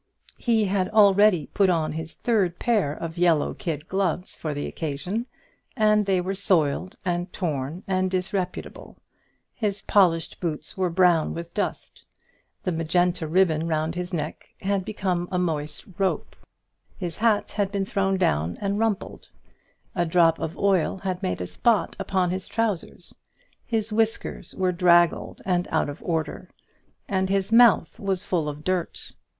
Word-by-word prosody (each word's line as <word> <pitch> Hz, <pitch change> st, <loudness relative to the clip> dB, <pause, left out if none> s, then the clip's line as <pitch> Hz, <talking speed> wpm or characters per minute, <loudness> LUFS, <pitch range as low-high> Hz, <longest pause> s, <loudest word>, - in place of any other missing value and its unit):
He 225 Hz, -3 st, +2 dB
had 190 Hz, -1 st, 0 dB
already 205 Hz, -5 st, +5 dB
put 195 Hz, -1 st, +3 dB
on 165 Hz, -3 st, +1 dB
his 160 Hz, +1 st, -6 dB
third 195 Hz, -7 st, +1 dB
pair 215 Hz, -12 st, +1 dB
of 165 Hz, +3 st, -6 dB
yellow 170 Hz, -4 st, +3 dB
kid 155 Hz, -3 st, -4 dB
gloves 185 Hz, -2 st, -1 dB
for 155 Hz, -, -4 dB
the 145 Hz, 0 st, -3 dB
occasion, 180 Hz, -, -4 dB, 0.5 s
and 210 Hz, -2 st, +3 dB
they 190 Hz, -2 st, +3 dB
were 185 Hz, +2 st, -2 dB
soiled 185 Hz, -3 st, +1 dB
and 175 Hz, 0 st, -1 dB
torn 155 Hz, 0 st, -3 dB
and 185 Hz, -1 st, 0 dB
disreputable; 185 Hz, 0 st, -4 dB, 0.6 s
his 205 Hz, -3 st, -2 dB
polished 175 Hz, -5 st, +2 dB
boots 160 Hz, -4 st, -4 dB
were 185 Hz, -1 st, 0 dB
brown 175 Hz, -2 st, +3 dB
with 170 Hz, 0 st, -7 dB
dust; 205 Hz, -, -4 dB, 0.6 s
the 185 Hz, -, 0 dB
magenta 170 Hz, +1 st, +1 dB
ribbon 165 Hz, -1 st, +2 dB
round 160 Hz, 0 st, 0 dB
his 180 Hz, +1 st, -4 dB
neck 155 Hz, -3 st, -4 dB
had 195 Hz, 0 st, 0 dB
become 185 Hz, -4 st, -2 dB
a 180 Hz, -, 0 dB
moist 155 Hz, -4 st, -2 dB
rope; 195 Hz, -1 st, -1 dB, 0.6 s
his 175 Hz, -2 st, -5 dB
hat 220 Hz, -2 st, +2 dB
had 200 Hz, -2 st, -1 dB
been 200 Hz, -1 st, -1 dB
thrown 195 Hz, -1 st, 0 dB
down 80 Hz, -, 0 dB
and 200 Hz, 0 st, -1 dB
rumpled; 220 Hz, -3 st, -2 dB, 0.6 s
a 175 Hz, -, +1 dB
drop 165 Hz, -1 st, +3 dB
of 160 Hz, -, -4 dB
oil 195 Hz, -3 st, +2 dB
had 185 Hz, -1 st, -3 dB
made 90 Hz, 0 st, -2 dB
a -, -, -2 dB
spot 225 Hz, -, +1 dB
upon 190 Hz, -2 st, 0 dB
his 185 Hz, 0 st, -4 dB
trousers; 220 Hz, -6 st, -2 dB, 0.5 s
his 225 Hz, -2 st, -1 dB
whiskers 225 Hz, +1 st, -1 dB
were 185 Hz, -1 st, +1 dB
draggled 175 Hz, -1 st, +3 dB
and 180 Hz, -1 st, +1 dB
out 160 Hz, -2 st, +1 dB
of 145 Hz, -, -8 dB
order, 165 Hz, +2 st, -3 dB, 0.6 s
and 190 Hz, -1 st, 0 dB
his 195 Hz, +1 st, 0 dB
mouth 230 Hz, -7 st, +5 dB
was 195 Hz, -2 st, -2 dB
full 165 Hz, -5 st, 0 dB
of 150 Hz, +1 st, -8 dB
dirt. 185 Hz, -1 st, -2 dB
180 Hz, 155 wpm, -25 LUFS, 165-195 Hz, 0.6 s, already